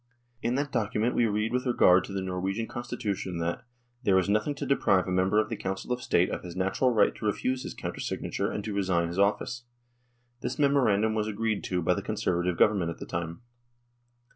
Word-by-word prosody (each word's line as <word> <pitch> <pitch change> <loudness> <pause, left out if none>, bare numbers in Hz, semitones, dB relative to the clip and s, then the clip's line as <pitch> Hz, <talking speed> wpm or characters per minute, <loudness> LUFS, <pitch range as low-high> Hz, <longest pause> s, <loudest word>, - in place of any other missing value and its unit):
In 120 +2 0
that 145 +1 -1
document 110 0 0
we 120 - +3
read 105 +2 -1
with 125 +1 0
regard 95 -6 +5
to - - -9
the 95 -1 -2
Norwegian 95 +4 -2
Constitution 110 -7 -4
that 85 +1 -2 0.4
"there 100 -7 +3
is 95 - +2
nothing 105 +8 +1
to 140 - -4
deprive 100 -9 +2
a - - -2
member 95 +3 +2
of 110 - +1
the 115 - -2
Council 95 +3 -3
of 125 - -4
State 90 -6 +2
of - - -3
his 90 -1 -8
natural 95 +7 +1
right 110 -3 +3
to - - -8
refuse 125 +5 0
his - - -6
counter - - -5
signature - - -2
and 105 - -4
to 105 - -4
resign 90 -4 +1
his 85 +3 -4
office." 110 +4 +1 0.8
This - - -3
memorandum 120 -8 +3
was 110 -1 0
agreed 110 0 -1
to 90 -2 -1
by - - +3
the - - -3
Conservative 90 -1 -1
Government 100 -6 +3
at 85 - -5
the - - -7
time. 85 +5 -5
105 Hz, 210 wpm, -28 LUFS, 95-120 Hz, 0.8 s, regard